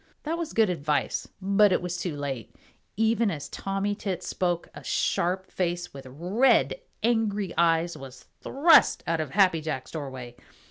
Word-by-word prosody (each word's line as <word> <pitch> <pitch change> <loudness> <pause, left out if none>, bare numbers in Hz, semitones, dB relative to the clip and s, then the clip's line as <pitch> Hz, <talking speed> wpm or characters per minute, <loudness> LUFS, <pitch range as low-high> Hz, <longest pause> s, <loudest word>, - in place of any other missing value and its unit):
That 315 +2 -2
was 330 -2 -4
good 220 -4 +3
advice, 150 -3 -1
but 200 +1 +4
it - - +3
was 180 0 -4
too 175 -3 -3
late. 135 -5 -5 0.4
Even 225 0 +2
as 150 -7 -5
Tommy 195 +1 -2
Tit 190 -3 -4
spoke, 175 -2 -1
a - - -11
sharp 185 +2 0
face 175 -1 -2
with 135 -1 -10
red, 200 - +2 0.2
angry 215 -5 0
eyes 170 0 +2
was 130 -1 -11 0.2
thrust 310 +5 +4
out 165 0 0
of 155 - -4
Happy 180 -1 +3
Jack's 130 -5 -4
doorway. 130 -6 -7
180 Hz, 155 wpm, -26 LUFS, 155-205 Hz, 0.4 s, but